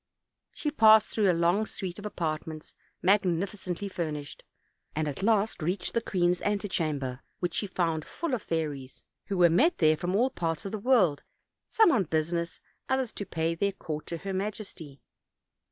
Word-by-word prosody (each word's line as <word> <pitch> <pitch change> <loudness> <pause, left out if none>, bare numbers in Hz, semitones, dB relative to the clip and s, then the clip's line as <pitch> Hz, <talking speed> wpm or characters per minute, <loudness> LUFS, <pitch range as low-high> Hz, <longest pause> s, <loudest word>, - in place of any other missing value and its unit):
She 300 - -3
passed 220 -5 +6
through 210 -3 +2
a - - +5
long 190 +6 +3
suite 185 -1 -5
of 210 - -5
apartments 155 -4 -4 0.3
magnificently 190 0 +1
furnished, 155 -6 -5 0.5
and 155 0 0
at 145 +4 -4
last 210 -2 +2
reached 180 +6 -1
the 230 - +1
queen's 180 -4 +1
antechamber, 155 -11 -1 0.2
which 175 -2 -2
she 205 - -1
found 165 -4 -1
full 335 - -4
of 245 - 0
fairies, 145 -5 -4 0.2
who 195 - -2
were 175 -1 +7
met 280 - +3
there 155 -1 +4
from 175 +4 -2
all 250 +5 +3
parts 165 0 -2
of 195 - -4
the 215 - -3
world, 200 - +3 0.5
some 445 -6 +5
on 210 -8 +2
business, 170 +2 -1 0.3
others 265 -3 0
to 205 - -6
pay 165 -2 -1
their 200 +4 0
court 155 -4 -6
to 170 - -3
her 195 +3 -5
majesty. 190 -7 -5
180 Hz, 170 wpm, -28 LUFS, 160-210 Hz, 0.5 s, were